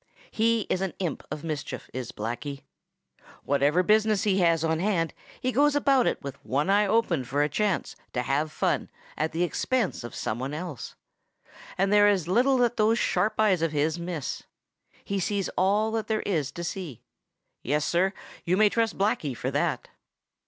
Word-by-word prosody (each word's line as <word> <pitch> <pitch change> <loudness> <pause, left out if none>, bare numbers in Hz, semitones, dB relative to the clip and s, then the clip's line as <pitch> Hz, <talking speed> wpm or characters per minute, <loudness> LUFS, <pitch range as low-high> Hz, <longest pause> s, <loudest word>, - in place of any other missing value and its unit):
He 230 0 +2
is 185 -2 -2
an 190 -2 -2
imp 175 -4 -3
of 150 -1 -6
mischief, 155 -3 -5
is 130 -1 -5
Blacky. 120 +6 -5 0.8
Whatever 145 +5 +2
business 215 0 +3
he 195 -2 +2
has 165 -3 +3
on 160 0 +1
hand 170 -5 0 0.3
he 255 - -1
goes 290 +3 +3
about 275 -3 +3
it - - 0
with 140 -1 -8
one 145 +8 0
eye 205 +1 +4
open 195 - +1
for 140 +4 0
a - - +2
chance 205 +4 -1 0.2
to 125 - -1
have 150 +4 0
fun - - 0 0.3
at 155 +1 -1
the 165 +2 0
expense 225 - -1
of 120 - -8
some 110 - -3
one 135 +3 -3
else. 155 -7 -6 0.8
And 195 +2 +2
there 205 0 +6
is 190 -6 +2
little 250 +8 +3
that 240 -1 +2
those 220 +2 +3
sharp 195 +2 0
eyes 200 -6 +3
of 165 -2 0
his 155 +3 0
miss. 170 -4 -4 0.6
He 200 0 -2
sees 195 0 -1
all 205 +4 +1
that 225 -1 -2
there 220 -1 0
is 155 -8 -1
to 170 - -6
see. 170 - -6 0.6
Yes, 150 +3 0
Sir, 185 +3 +2 0.3
you 180 +2 +1
may 215 0 +5
trust 225 0 0
Blacky 160 - 0
for - - -2
that! - - -1
180 Hz, 180 wpm, -27 LUFS, 150-210 Hz, 0.8 s, there